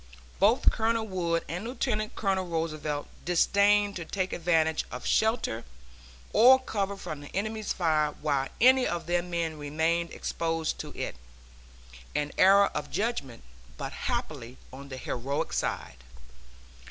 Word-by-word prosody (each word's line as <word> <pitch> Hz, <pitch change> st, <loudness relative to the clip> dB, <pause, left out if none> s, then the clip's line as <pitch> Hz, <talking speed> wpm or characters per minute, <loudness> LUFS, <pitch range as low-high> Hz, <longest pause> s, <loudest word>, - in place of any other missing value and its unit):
Both 215 Hz, +7 st, +5 dB
Colonel 225 Hz, 0 st, 0 dB
Wood 170 Hz, -4 st, -1 dB
and 175 Hz, +4 st, -4 dB
Lieutenant 230 Hz, -3 st, -2 dB
Colonel 190 Hz, -3 st, 0 dB
Roosevelt 155 Hz, -3 st, -2 dB, 0.2 s
disdained 200 Hz, +3 st, +3 dB
to 170 Hz, -, -5 dB
take 185 Hz, +3 st, -3 dB
advantage 160 Hz, -2 st, +2 dB
of 125 Hz, -, -7 dB
shelter 220 Hz, -, +1 dB, 0.7 s
or 250 Hz, +5 st, +8 dB
cover 200 Hz, -6 st, -3 dB
from 155 Hz, -6 st, -6 dB
the 145 Hz, -, -10 dB
enemy's 215 Hz, +2 st, -2 dB
fire 155 Hz, -4 st, +1 dB
while 140 Hz, -3 st, 0 dB
any 260 Hz, +2 st, +6 dB
of 170 Hz, -1 st, -3 dB
their 175 Hz, +1 st, +1 dB
men 170 Hz, -3 st, -3 dB
remained 160 Hz, +3 st, 0 dB
exposed 165 Hz, -1 st, -2 dB
to -, -, -5 dB
it -, -, -4 dB, 1.0 s
an 150 Hz, 0 st, -1 dB
error 195 Hz, +2 st, +7 dB
of 150 Hz, -, -4 dB
judgment, 185 Hz, -, -3 dB, 0.3 s
but -, -, -5 dB
happily 120 Hz, +2 st, -4 dB, 0.2 s
on 140 Hz, +1 st, -10 dB
the 130 Hz, -, -6 dB
heroic 130 Hz, +3 st, -3 dB
side. 60 Hz, -, -3 dB
170 Hz, 135 wpm, -28 LUFS, 150-205 Hz, 1.0 s, or